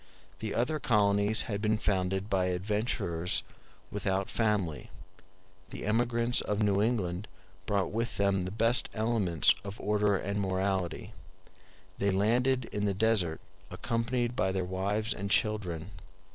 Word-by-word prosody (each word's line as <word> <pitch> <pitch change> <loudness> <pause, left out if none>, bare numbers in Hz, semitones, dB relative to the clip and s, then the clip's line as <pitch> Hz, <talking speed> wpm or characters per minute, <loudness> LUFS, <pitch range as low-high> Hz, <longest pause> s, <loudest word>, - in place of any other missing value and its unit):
The 110 -2 -3
other 150 +6 0
colonies 105 -2 +3
had 100 -4 -3
been 110 0 +2
founded 95 -1 0
by 95 -3 +1
adventurers 90 -2 -1 0.5
without 95 -1 -1
family; 105 -9 0 0.8
the - - -6
emigrants 120 +2 +2
of 105 +1 -1
New 100 -1 +2
England 105 -4 -1 0.4
brought 100 -2 0
with 115 +1 -2
them 100 -2 +1
the - - -3
best 115 +3 +2
elements 110 -8 +3
of 100 +2 -7
order 105 -1 +2
and 100 +2 -2
morality—they 95 0 -4
landed 120 +6 +2
in 105 0 -1
the 100 -2 0
desert 100 -6 +1 0.3
accompanied 115 +5 -1
by 95 -5 +1
their 95 -1 -1
wives 100 +4 -1
and 100 +1 -5
children. 95 -5 0
100 Hz, 130 wpm, -30 LUFS, 95-110 Hz, 0.8 s, colonies